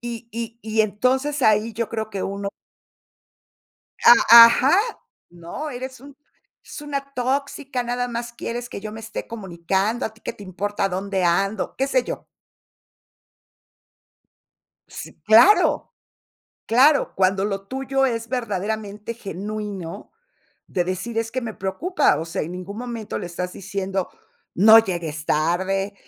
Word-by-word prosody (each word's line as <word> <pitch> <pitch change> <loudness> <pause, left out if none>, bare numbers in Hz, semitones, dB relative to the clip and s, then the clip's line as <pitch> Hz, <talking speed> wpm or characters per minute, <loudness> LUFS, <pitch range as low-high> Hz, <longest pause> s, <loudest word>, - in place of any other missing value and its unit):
Y 235 -1 -7
y 230 0 -6
y 220 0 0
entonces 260 +7 0
ahí 220 +1 +3
yo 230 +1 -3
creo 220 -1 -4
que 195 -2 -4
uno 200 0 -3 1.6
A 235 0 +10
ajá. 265 +8 +3 0.5
¿No?, 175 - -7
eres 260 0 -7
un 280 +1 -14 0.5
es - - -9
una 280 -1 -5
tóxica, 265 0 -2
nada 245 +1 -2
más 240 0 -5
quieres 240 0 -5
que - - -7
yo 215 +1 -6
me 220 - -9
esté 220 0 -7
comunicando, 195 +2 -2
a 220 - -3
ti 220 - -23
qué - - -5
te - - -13
importa 200 +1 -2
dónde 190 0 -2
ando. 195 +5 0
Qué 270 - 0
sé - - +2
yo. - - -6 2.6
Si, - - -9
¡claro! 235 - +5 0.7
Claro, 275 +5 +4
cuando 190 +1 +2
lo 195 -1 -3
tuyo 270 +2 0
es 230 -2 -3
verdaderamente 215 -2 -3
genuino, 205 -4 -6 0.5
de 175 -2 -1
decir: 185 +6 -3
"Es 225 0 -2
que 255 - -2
me 225 -3 -6
preocupa", 300 - 0
o 160 - -3
sea, 170 +3 -3
en 165 - -5
ningún 185 +3 -7
momento 235 -3 -5
le - - -5
estás 180 +1 -5
diciendo: 195 -1 -3 0.5
"No 220 +4 +8
llegues 170 -7 -2
tarde", 190 +6 0
220 Hz, 140 wpm, -22 LUFS, 195-245 Hz, 2.6 s, A